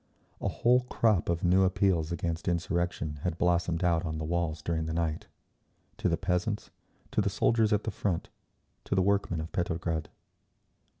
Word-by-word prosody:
A -, -, -1 dB
whole 125 Hz, +1 st, +3 dB
crop 110 Hz, -9 st, +2 dB
of 85 Hz, 0 st, 0 dB
new 90 Hz, +2 st, +4 dB
appeals 95 Hz, -3 st, +2 dB
against 85 Hz, -1 st, -3 dB
insurrection 85 Hz, -3 st, -1 dB
had 90 Hz, -1 st, -2 dB
blossomed 85 Hz, -1 st, +1 dB
out 85 Hz, -2 st, +2 dB
on 80 Hz, -2 st, -3 dB
the 80 Hz, -, -3 dB
walls 80 Hz, -1 st, -1 dB
during 80 Hz, -1 st, -1 dB
the 80 Hz, -, -3 dB
night—to 85 Hz, +2 st, -5 dB
the 85 Hz, -, +1 dB
peasants, 90 Hz, +4 st, -1 dB, 0.4 s
to -, -, +2 dB
the -, -, +1 dB
soldiers 115 Hz, -2 st, +2 dB
at 105 Hz, 0 st, +2 dB
the 110 Hz, -, -2 dB
front, 95 Hz, -4 st, -2 dB, 0.6 s
to -, -, -1 dB
the 95 Hz, -, +3 dB
workmen 100 Hz, -4 st, +1 dB
of 80 Hz, +2 st, -5 dB
Petrograd. 85 Hz, -2 st, -2 dB
85 Hz, 165 wpm, -29 LUFS, 80-95 Hz, 0.6 s, new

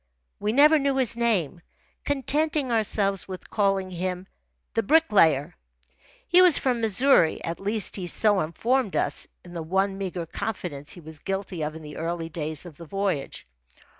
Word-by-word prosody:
We 210 Hz, -, 0 dB
never 300 Hz, +5 st, +6 dB
knew 275 Hz, -1 st, 0 dB
his 250 Hz, -4 st, +2 dB
name, 200 Hz, -9 st, 0 dB, 0.4 s
contenting 285 Hz, 0 st, 0 dB
ourselves 200 Hz, -3 st, 0 dB
with 185 Hz, -1 st, -9 dB
calling 195 Hz, -2 st, +1 dB
him 180 Hz, +1 st, -3 dB, 0.5 s
the 225 Hz, -, +2 dB
"Bricklayer." 195 Hz, -, +3 dB, 0.7 s
He 360 Hz, +1 st, +6 dB
was 360 Hz, -5 st, +7 dB
from 250 Hz, -3 st, 0 dB
Missouri 225 Hz, -, +3 dB
at 165 Hz, 0 st, -4 dB
least 205 Hz, +1 st, -1 dB
he 180 Hz, -2 st, -4 dB
so 205 Hz, +3 st, +2 dB
informed 220 Hz, +8 st, 0 dB
us -, -, -1 dB, 0.2 s
in 175 Hz, -, -12 dB
the 170 Hz, -, -4 dB
one 195 Hz, +4 st, 0 dB
meagre 180 Hz, -3 st, -4 dB
confidence 165 Hz, -6 st, -5 dB
he 175 Hz, -, -10 dB
was 155 Hz, -1 st, -9 dB
guilty 195 Hz, -2 st, -4 dB
of 155 Hz, +1 st, -3 dB
in 160 Hz, -, -9 dB
the 150 Hz, -1 st, -9 dB
early 165 Hz, 0 st, -3 dB
days 155 Hz, -1 st, -4 dB
of 165 Hz, -5 st, -11 dB
the 170 Hz, -, -10 dB
voyage. 195 Hz, -6 st, -3 dB
195 Hz, 165 wpm, -25 LUFS, 170-230 Hz, 0.7 s, was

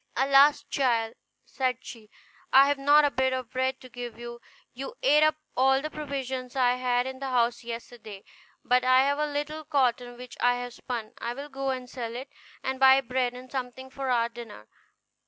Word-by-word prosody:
"Alas! 275 Hz, +2 st, +5 dB
child," 235 Hz, -6 st, 0 dB, 0.3 s
said 255 Hz, -2 st, -1 dB
she, 220 Hz, -3 st, -11 dB, 0.4 s
"I 270 Hz, +1 st, +8 dB
have 285 Hz, -1 st, 0 dB
not 290 Hz, +2 st, +5 dB
a 290 Hz, -, +1 dB
bit 260 Hz, 0 st, +1 dB
of 255 Hz, -2 st, -4 dB
bread 260 Hz, 0 st, -1 dB
to 255 Hz, -, -11 dB
give 240 Hz, -2 st, -8 dB
you: 235 Hz, 0 st, -9 dB, 0.3 s
you 270 Hz, +2 st, -7 dB
ate 295 Hz, +3 st, +5 dB
up 310 Hz, 0 st, +4 dB, 0.2 s
all 265 Hz, +1 st, +4 dB
the 305 Hz, +2 st, -5 dB
provisions 265 Hz, -4 st, -5 dB
I 250 Hz, -2 st, +3 dB
had 250 Hz, -1 st, +1 dB
in 260 Hz, 0 st, -6 dB
the 270 Hz, -, -4 dB
house 240 Hz, -1 st, +1 dB
yesterday; 230 Hz, -3 st, -8 dB, 0.4 s
but 250 Hz, 0 st, +3 dB
I 255 Hz, +1 st, +5 dB
have 285 Hz, +1 st, 0 dB
a 300 Hz, -, +1 dB
little 295 Hz, +2 st, -4 dB
cotton, 250 Hz, -5 st, 0 dB
which 250 Hz, 0 st, -11 dB
I 245 Hz, 0 st, +3 dB
have 245 Hz, 0 st, -6 dB
spun; 240 Hz, -3 st, -6 dB
I 235 Hz, +1 st, -4 dB
will 285 Hz, +2 st, -8 dB
go 270 Hz, -1 st, -3 dB
and 255 Hz, -1 st, -3 dB
sell 235 Hz, -2 st, -6 dB
it, 260 Hz, +3 st, -7 dB, 0.3 s
and 265 Hz, 0 st, -3 dB
buy 265 Hz, 0 st, +7 dB
bread 250 Hz, -1 st, -1 dB
and 255 Hz, +1 st, -11 dB
something 260 Hz, 0 st, -6 dB
for 270 Hz, -1 st, -4 dB
our 235 Hz, -2 st, +2 dB
dinner." 230 Hz, -, -11 dB
255 Hz, 195 wpm, -27 LUFS, 245-275 Hz, 0.4 s, I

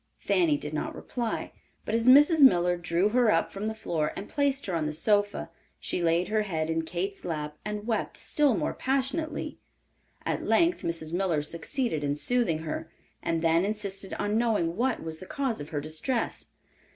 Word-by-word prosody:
Fanny 330 Hz, -5 st, +2 dB
did -, -, -6 dB
not -, -, -3 dB
reply, 235 Hz, -3 st, -3 dB, 0.3 s
but -, -, -3 dB
as 230 Hz, +1 st, +1 dB
Mrs. 295 Hz, +5 st, +7 dB
Miller 180 Hz, -9 st, +6 dB
drew 175 Hz, +3 st, +1 dB
her 240 Hz, 0 st, +3 dB
up 165 Hz, -, +1 dB
from 200 Hz, +2 st, -4 dB
the 220 Hz, -, -3 dB
floor 165 Hz, -8 st, -2 dB
and 200 Hz, -, -6 dB
placed 280 Hz, -1 st, 0 dB
her 190 Hz, -, -3 dB
on 160 Hz, -2 st, 0 dB
the 150 Hz, -, -3 dB
sofa, 205 Hz, +5 st, +1 dB, 0.3 s
she -, -, -3 dB
laid 170 Hz, +1 st, +2 dB
her 215 Hz, 0 st, +2 dB
head 165 Hz, -6 st, -2 dB
in 165 Hz, 0 st, +1 dB
Kate's 180 Hz, +4 st, -4 dB
lap 150 Hz, -3 st, -3 dB
and 210 Hz, 0 st, -4 dB
wept 225 Hz, -2 st, -1 dB
still 290 Hz, -6 st, +2 dB
more -, -, -1 dB
passionately. 275 Hz, +4 st, -2 dB, 0.7 s
At -, -, -1 dB
length 340 Hz, +1 st, +3 dB
Mrs. 165 Hz, -1 st, -3 dB
Miller 175 Hz, -5 st, +1 dB
succeeded 170 Hz, -, -2 dB
in 145 Hz, 0 st, 0 dB
soothing 170 Hz, -3 st, +1 dB
her, 155 Hz, -, -4 dB, 0.3 s
and 165 Hz, 0 st, -1 dB
then 165 Hz, +1 st, +4 dB
insisted 200 Hz, -2 st, -3 dB
on 210 Hz, +2 st, 0 dB
knowing 210 Hz, -8 st, +1 dB
what 245 Hz, +3 st, 0 dB
was 160 Hz, -1 st, -5 dB
the 185 Hz, -, -10 dB
cause 265 Hz, -, -2 dB
of 145 Hz, -, -7 dB
her 150 Hz, -, -2 dB
distress. 155 Hz, -, -3 dB
195 Hz, 185 wpm, -28 LUFS, 165-245 Hz, 0.7 s, Mrs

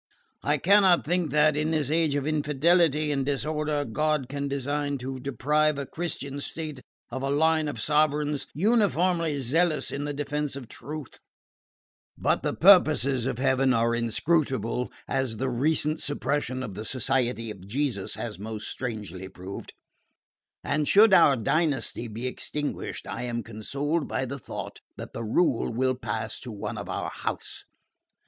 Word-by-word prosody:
I 150 Hz, +1 st, +1 dB
cannot 190 Hz, +2 st, +5 dB
think 175 Hz, -1 st, 0 dB
that, 150 Hz, +1 st, +4 dB
in 150 Hz, +1 st, 0 dB
this 155 Hz, -3 st, 0 dB
age 160 Hz, -3 st, +2 dB
of 140 Hz, -1 st, -1 dB
infidelity 155 Hz, +1 st, +2 dB
and 140 Hz, -2 st, 0 dB
disorder, 150 Hz, +1 st, -1 dB
God 150 Hz, +3 st, 0 dB
can 140 Hz, 0 st, -3 dB
design 140 Hz, +1 st, -1 dB
to 130 Hz, +1 st, -5 dB
deprive 150 Hz, +4 st, +1 dB
a 140 Hz, -, -3 dB
Christian 145 Hz, -3 st, -4 dB
state 155 Hz, -3 st, -5 dB, 0.3 s
of 130 Hz, +2 st, -4 dB
a 135 Hz, -, -1 dB
line 155 Hz, +2 st, +2 dB
of 145 Hz, -, -4 dB
sovereigns 150 Hz, -1 st, +1 dB
uniformly 180 Hz, -5 st, +2 dB
zealous 155 Hz, +5 st, +1 dB
in 145 Hz, +1 st, -3 dB
the 145 Hz, -, -2 dB
defence 145 Hz, 0 st, -2 dB
of 135 Hz, -4 st, -7 dB
truth; 150 Hz, +3 st, -8 dB, 1.0 s
but -, -, +1 dB
the -, -, -1 dB
purposes 150 Hz, -9 st, +5 dB
of 125 Hz, -, -2 dB
Heaven 130 Hz, 0 st, +3 dB
are 115 Hz, +1 st, +2 dB
inscrutable, 125 Hz, 0 st, 0 dB, 0.2 s
as 130 Hz, -4 st, -1 dB
the 130 Hz, +2 st, -1 dB
recent 155 Hz, +4 st, +1 dB
suppression 145 Hz, -3 st, -1 dB
of 110 Hz, -6 st, -6 dB
the 105 Hz, +3 st, -6 dB
Society 120 Hz, -1 st, 0 dB
of 95 Hz, -2 st, -11 dB
Jesus 120 Hz, -4 st, -1 dB
has 105 Hz, -4 st, -5 dB
most 110 Hz, +1 st, -5 dB
strangely 105 Hz, -7 st, -5 dB
proved; 95 Hz, +1 st, -8 dB, 0.9 s
and 150 Hz, 0 st, 0 dB
should 210 Hz, 0 st, +7 dB
our 165 Hz, -6 st, +7 dB
dynasty 135 Hz, -1 st, 0 dB
be 115 Hz, +3 st, -6 dB
extinguished 145 Hz, +3 st, -4 dB
I -, -, -4 dB
am 120 Hz, -1 st, -3 dB
consoled 140 Hz, +8 st, -2 dB
by 135 Hz, -, -1 dB
the 140 Hz, +2 st, -5 dB
thought -, -, -7 dB, 0.2 s
that -, -, -8 dB
the 115 Hz, -, -4 dB
rule 125 Hz, +3 st, +1 dB
will 130 Hz, +3 st, +1 dB
pass 110 Hz, -3 st, -4 dB
to 125 Hz, -, -7 dB
one 105 Hz, -, -5 dB
of -, -, -7 dB
our -, -, -3 dB
house. -, -, -5 dB
140 Hz, 155 wpm, -27 LUFS, 125-155 Hz, 1.0 s, should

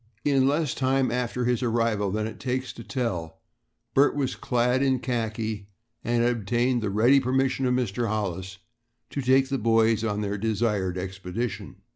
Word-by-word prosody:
In 135 Hz, -2 st, +3 dB
less 145 Hz, 0 st, +1 dB
time 130 Hz, -1 st, +1 dB
after 125 Hz, 0 st, -1 dB
his 125 Hz, 0 st, +1 dB
arrival 115 Hz, -4 st, +1 dB
than 105 Hz, +2 st, -1 dB
it 110 Hz, 0 st, -7 dB
takes 130 Hz, 0 st, -2 dB
to 115 Hz, -, -10 dB
tell, 90 Hz, -11 st, -3 dB, 0.6 s
Bert 140 Hz, +2 st, +4 dB
was 135 Hz, -3 st, -1 dB
clad 125 Hz, +1 st, +1 dB
in 135 Hz, -1 st, +3 dB
khaki 110 Hz, -4 st, -3 dB, 0.4 s
and 120 Hz, 0 st, +1 dB
had 120 Hz, -, +3 dB
obtained 120 Hz, +3 st, 0 dB
the 105 Hz, -, -1 dB
ready 120 Hz, +7 st, +5 dB
permission 130 Hz, 0 st, +1 dB
of 125 Hz, -, +2 dB
Mr. 120 Hz, -1 st, -1 dB
Hollis 100 Hz, -3 st, -3 dB, 0.5 s
to 140 Hz, -, -2 dB
take 130 Hz, +1 st, +3 dB
the 135 Hz, -1 st, -1 dB
boys 115 Hz, 0 st, +3 dB
on 105 Hz, -2 st, -1 dB
their 100 Hz, -1 st, -2 dB
desired 105 Hz, -4 st, 0 dB
expedition. 95 Hz, +5 st, -5 dB
120 Hz, 165 wpm, -26 LUFS, 105-130 Hz, 0.6 s, ready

